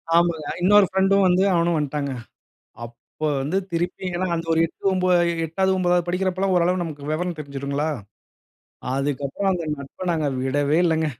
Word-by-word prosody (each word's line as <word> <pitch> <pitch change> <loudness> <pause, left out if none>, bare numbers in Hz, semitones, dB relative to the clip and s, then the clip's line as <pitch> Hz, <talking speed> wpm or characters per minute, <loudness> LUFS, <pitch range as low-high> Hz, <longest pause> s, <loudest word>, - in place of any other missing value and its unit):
ஆமாங்க. 170 -2 +2
அ - - -2
இன்னொரு 205 +2 +6
ஃப்ரெண்டும் 195 +1 +3
வந்து 180 +1 +3
அவனும் 170 0 +2
வன்ட்டாங்க. 145 -1 -2 0.7
அப்போ 120 +6 -7
வந்து 145 +7 -2 0.2
திருப்பி, 175 +2 -2
ஏன்னா 185 +2 -1
அந்த 165 0 -4
ஒரு 165 - +2
8 180 - -3
ஒன்ப 185 -1 0 0.3
எ - - -3
8து 190 +4 0
9தாது 175 -1 +1
படிக்கிறப்போலாம் 185 +1 0
ஓரளவு 180 +1 +2
நமக்கு 150 -4 -7
விவரம் 175 +2 -2
தெரிஞ்சுடுங்களா! 140 +1 -3 1.1
அதுக்கப்புறம் 140 +7 -1
அந்த 175 -2 -3
நட்ப 140 +6 -10
நாங்க 155 -3 -1 0.2
விடவே 145 +3 +1
இல்லங்க. 160 -2 +2
170 Hz, 155 wpm, -23 LUFS, 145-185 Hz, 1.1 s, இன்னொரு